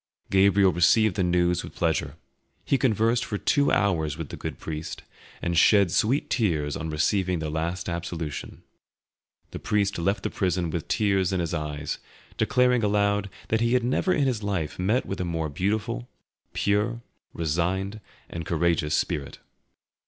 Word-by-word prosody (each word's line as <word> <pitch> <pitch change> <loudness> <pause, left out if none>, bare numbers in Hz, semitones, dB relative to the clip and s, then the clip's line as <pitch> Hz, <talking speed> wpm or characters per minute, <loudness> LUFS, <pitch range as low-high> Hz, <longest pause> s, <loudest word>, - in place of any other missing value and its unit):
Gabriel 95 -1 +5
received 95 +4 +4
the 100 - 0
news 90 -1 +2
with - - -10
pleasure; - - 0 0.5
he - - +2
conversed 115 -2 +2
for 105 - -3
two 140 +6 +2
hours 80 -8 +1
with 80 -3 -6
the - - -6
good - - -6
priest, 80 0 -6 0.4
and 85 -1 +2
shed 100 -2 +5
sweet 125 +10 +1
tears 80 - 0
on 80 -1 -4
receiving 90 +4 +1
the 80 -2 -3
last 85 +3 -2
absolution. 85 -3 -5 0.9
The - - -6
priest 100 -3 0
left 95 +3 0
the - - -2
prison 90 -3 -1
with 80 -1 -4
tears 100 -4 +1
in 95 - 0
his 85 -1 -2
eyes, 75 -2 -3 0.4
declaring 125 -2 +2
aloud 100 -1 +1 0.2
that 110 0 +1
he 115 +1 +2
had 125 - +2
never 130 +9 +1
in 150 - +2
his 125 -5 0
life 95 -7 -3
met 105 +8 +1
with 95 - -4
a - - 0
more 80 -2 -2
beautiful, 95 - -2 0.4
pure, 105 +4 0 0.3
resigned, 90 +6 -1 0.3
and 85 - -6
courageous 80 -2 +1
spirit. 70 -2 -2
95 Hz, 160 wpm, -26 LUFS, 85-105 Hz, 0.9 s, Gabriel